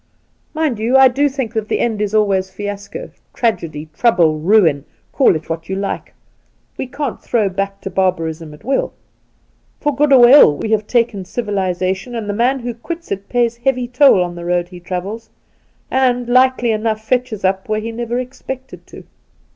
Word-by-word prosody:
Mind 305 -8 0
you, 235 +4 +3
I 265 -1 +7
do 285 +3 +1
think 265 -4 -4
that 220 -2 -2
the - - 0
end 220 -3 -1
is 210 0 -1
always 195 -3 +2
fiasco 205 - -7
— - - -44
tragedy, 160 -10 -2
trouble, 170 -10 +3
ruin, 165 -5 +3 0.3
call 265 - +4
it 155 - -6
what 165 +1 -5
you 190 - -2
like. 195 +1 -4 0.6
We - - -5
can't 280 -1 -4
throw 215 -4 0
back 195 +1 -4
to 195 - -6
barbarism 165 -4 -1
at - - -20
will. 270 +3 -1 0.9
For 295 -2 -1
good 295 +1 +2
or 250 -3 +8
ill 245 - +7
we 220 - -4
have 215 -1 +1
taken 230 -5 0
civilization, 190 +1 -2
and 225 -3 -4
the 205 - -2
man 250 +5 +1
who 240 0 -4
quits 335 +9 -8
it 200 0 -4
pays 240 -1 +1
heavy 250 0 0
toll 250 -6 +5
on 175 0 -5
the 175 0 -8
road 175 0 -1
he 180 -1 -11
travels, 190 +6 -5 0.6
and, 250 -2 +1
likely 255 -1 +3
enough, 220 0 -2
fetches 250 -6 -1
up 190 +2 -1
where 215 0 0
he 225 +1 -5
never 235 +1 -3
expected 260 +1 -7
to.' - - -12
220 Hz, 185 wpm, -17 LUFS, 190-250 Hz, 0.9 s, or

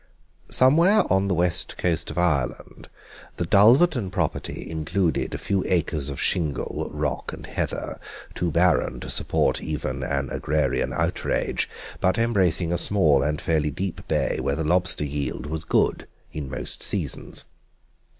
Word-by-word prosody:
Somewhere 170 +11 +5
on 95 +1 +2
the 95 - +1
west 85 0 +2
coast 85 -2 0
of 75 - -7
Ireland 70 -8 -1 0.5
the 85 - -1
Dulverton 115 - +5
property 90 -5 -3
included 80 +2 -1
a - - -3
few 95 -2 -1
acres 75 -5 0
of 70 - -5
shingle, 75 -8 -1
rock, - - -3
and - - -9
heather, - - -3 0.3
too 90 -1 -1
barren 85 +1 +2
to - - -5
support - - +1
even 70 -4 -3
an 65 0 -2
agrarian 75 0 0
outrage, - - -1 0.3
but 95 0 +2
embracing 95 -7 +2
a 85 - 0
small 80 -9 +3
and 75 +1 -1
fairly 80 -3 0
deep 90 +5 -5
bay - - 0
where 70 - -1
the 80 - -2
lobster 90 -1 +1
yield 70 -1 -3
was 80 +2 -4
good - - +1 0.3
in 75 -3 -5
most 65 - -3
seasons. - - -2
85 Hz, 145 wpm, -24 LUFS, 75-95 Hz, 0.5 s, Somewhere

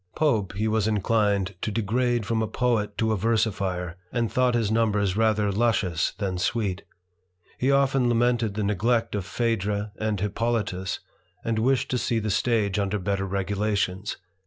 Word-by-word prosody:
Pope 110 -12 +1
he 105 +3 -1
was 110 -1 +1
inclined 105 -2 +1
to - - -1
degrade 115 +2 0
from 110 +1 0
a 110 - 0
poet 110 -5 0
to 110 -1 +1
a - - +2
versifier, 100 -5 -1
and 120 -2 -1
thought 125 -1 +2
his 110 -3 +1
numbers 105 -4 +1
rather 110 -2 +2
luscious 100 -6 +1
than 95 -3 -3
sweet. 100 -2 -1 0.8
He 130 - +2
often 135 -2 +3
lamented 120 -3 +1
the 105 - -1
neglect 115 +4 +1
of 100 -3 -2
Phaedra 105 -1 -1
and 110 -2 -1
Hippolitus, 105 -2 -1 0.4
and 115 -1 0
wished 130 +3 +1
to 125 - +1
see 115 - 0
the 110 -1 -1
stage 105 -2 +1
under 100 +1 0
better 100 0 -1
regulations. 100 0 -1
110 Hz, 160 wpm, -25 LUFS, 100-115 Hz, 0.8 s, often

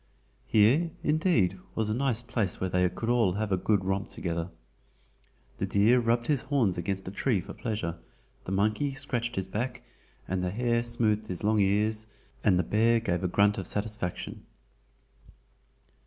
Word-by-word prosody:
Here, 125 +11 +4
indeed, 150 - +2 0.2
was 110 -1 0
a - - +1
nice 120 -1 0
place 115 -6 -2
where 95 -1 -2
they 90 0 +3
could 115 - -5
all 115 -6 +3
have 105 +1 -2
a - - +4
good 95 +1 +1
romp 95 +1 -1
together. 85 -1 -3 1.1
The 95 - -1
deer 105 +6 +4
rubbed 120 0 +1
his 145 -2 +1
horns 125 -10 +1
against 95 +2 -3
a - - -4
tree 100 +2 +1
for - - -8
pleasure, 105 -8 -3 0.5
the - - -5
monkey 110 +8 +1
scratched 120 -4 -2
his 95 -1 -2
back, 120 +6 -4 0.4
the 90 0 -1
hare 120 +4 +1
smoothed 110 -3 0
his 90 -1 -5
long 110 +1 +3
ears, 105 +2 +1 0.4
and 95 -3 +4
the 90 - +2
bear 115 +6 +3
gave 90 -5 -1
a - - +2
grunt 100 +3 +3
of 95 - -4
satisfaction. 105 -4 -2
105 Hz, 165 wpm, -28 LUFS, 95-120 Hz, 1.1 s, Here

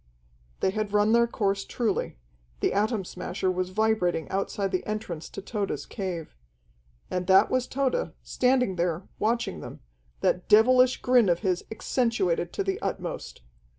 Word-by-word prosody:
They 190 - +2
had 210 0 -3
run 210 +1 +4
their 235 0 +5
course 195 -3 -1
truly. 220 - -2 0.4
The - - +1
Atom 210 0 0
Smasher 185 +1 -2
was 185 0 -2
vibrating 185 -5 +1
outside 195 0 -1
the 185 - -1
entrance 210 -7 -4
to 195 - -8
Tode's 205 -1 -3
cave. 180 -6 -5 0.8
And 180 0 -2
that 190 0 +5
was 255 -1 +1
Tode, 275 - -1
standing 250 -7 +1
there, 170 +1 -1
watching 230 - 0
them, - - -9 0.4
that 180 - 0
devilish 250 +4 +5
grin 245 -5 +5
of 170 -1 +1
his 185 -4 0
accentuated 210 -8 0
to - - -1
the 195 0 -2
utmost. - - -4
200 Hz, 150 wpm, -27 LUFS, 185-230 Hz, 0.8 s, their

